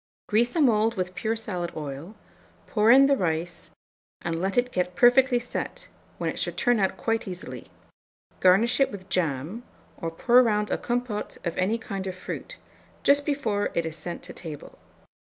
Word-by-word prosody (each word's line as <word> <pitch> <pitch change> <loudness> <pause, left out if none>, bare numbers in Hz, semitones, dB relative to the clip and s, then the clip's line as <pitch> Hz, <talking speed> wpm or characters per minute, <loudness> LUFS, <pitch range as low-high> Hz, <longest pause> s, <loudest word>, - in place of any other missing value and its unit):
Grease 235 +6 +2
a 330 - +3
mould 225 -3 +3
with 185 -1 -3
pure 220 +4 -1
salad 185 -6 -4
oil; 150 +6 -6 0.5
pour 215 0 +2
in 270 +3 +8
the 280 0 +4
rice, 170 -4 -2 0.5
and 165 0 -2
let 195 +4 -1
it 245 0 +2
get 180 -2 -1
perfectly 245 +4 +5
set, 245 - -5 0.3
when - - -2
it - - -3
should - - -3
turn 245 -2 +3
out 190 -1 0
quite 225 -1 -1
easily; 180 -1 -7 0.7
garnish 195 +8 +4
it 275 - +3
with 195 -2 -9
jam, 165 - -1 0.4
or 165 - -3
pour 240 +9 +4
round 210 -3 +1
a - - +1
compôte 240 -3 -3
of 170 - -2
any 195 +5 +1
kind 195 -4 -5
of 185 - -4
fruit, - - -7 0.5
just 285 +1 +4
before 220 -9 0
it 170 - +1
is 160 -1 -3
sent 170 +1 -6
to - - -9
table. 155 -4 -9
210 Hz, 175 wpm, -26 LUFS, 180-240 Hz, 0.7 s, in